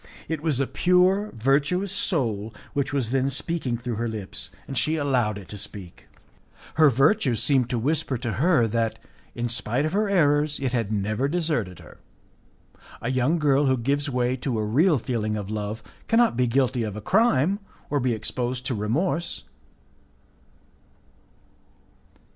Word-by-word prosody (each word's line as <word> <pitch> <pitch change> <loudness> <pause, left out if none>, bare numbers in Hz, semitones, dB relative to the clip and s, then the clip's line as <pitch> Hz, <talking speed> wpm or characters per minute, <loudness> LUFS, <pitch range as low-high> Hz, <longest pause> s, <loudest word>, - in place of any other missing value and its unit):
It 160 -2 -3
was 155 -5 0
a 135 - +2
pure, 185 +6 +2
virtuous 140 - +1
soul 115 - 0 0.2
which 140 -1 -1
was 130 -5 -1
then 135 0 +1
speaking 140 -3 -2
through 120 -2 -4
her 120 +1 -1
lips, 110 -4 -5 0.2
and 135 - -6
she 155 +5 +1
allowed 125 -8 +1
it 100 -3 -10
to 105 - -6
speak. 95 -3 -9 0.7
Her 155 -2 +6
virtue 135 - +3
seemed 125 +2 +2
to 125 - -1
whisper 135 +1 0
to 120 -1 -3
her 155 -9 +4
that, 115 0 -1 0.4
in 120 0 -1
spite 120 +3 0
of 155 - -2
her 210 +1 +1
errors, 150 -5 +2
it 130 -2 -2
had 115 -4 -1
never 105 +5 0
deserted 150 - -1
her. - - -15 1.0
A 120 - -2
young 130 +6 +2
girl 145 -2 +3
who 130 0 +3
gives 140 +4 0
way 125 -1 0
to 125 -2 -2
a 110 - -1
real 150 - +3
feeling 110 -3 -2
of 105 0 -5
love 105 +1 -4 0.2
cannot 230 - +3
be 125 +1 +2
guilty 130 0 +1
of 105 -3 -3
a - - -4
crime, 195 - +2 0.3
or 145 - +2
be 125 -2 +1
exposed 125 +3 -3
to 125 - -1
remorse. 155 - -1
130 Hz, 160 wpm, -25 LUFS, 115-150 Hz, 1.0 s, Her